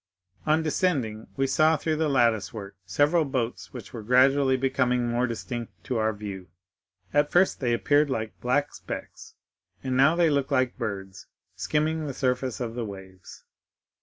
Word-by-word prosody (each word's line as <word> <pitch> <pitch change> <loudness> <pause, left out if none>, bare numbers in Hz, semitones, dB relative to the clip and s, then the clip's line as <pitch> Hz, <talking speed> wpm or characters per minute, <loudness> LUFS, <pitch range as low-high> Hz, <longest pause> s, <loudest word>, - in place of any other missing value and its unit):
On 155 +1 +3
descending, 140 - -1
we 135 - +2
saw 155 +4 +3
through 155 +1 -1
the 160 -1 +1
lattice 120 -6 +2
work 100 -3 -8
several 150 - +3
boats 115 - -3
which - - -10
were 115 - -6
gradually 130 +3 +4
becoming 125 -2 +1
more 120 +1 +1
distinct 115 -1 -5
to 125 - -2
our 110 0 +2
view. 100 -3 -7 0.7
At 145 0 +3
first 185 +2 +3
they 125 -3 0
appeared 145 +5 +3
like 110 -4 -4
black 145 +4 0
specks, - - -8 0.5
and 130 -1 -1
now 140 +5 +5
they 170 -2 +3
looked 140 0 0
like 130 -2 +1
birds 95 -5 -6 0.3
skimming 155 +1 -1
the 135 - -5
surface 125 -1 -1
of 120 -3 -3
the 120 0 -3
waves. 95 -3 -10
130 Hz, 165 wpm, -26 LUFS, 110-145 Hz, 0.7 s, now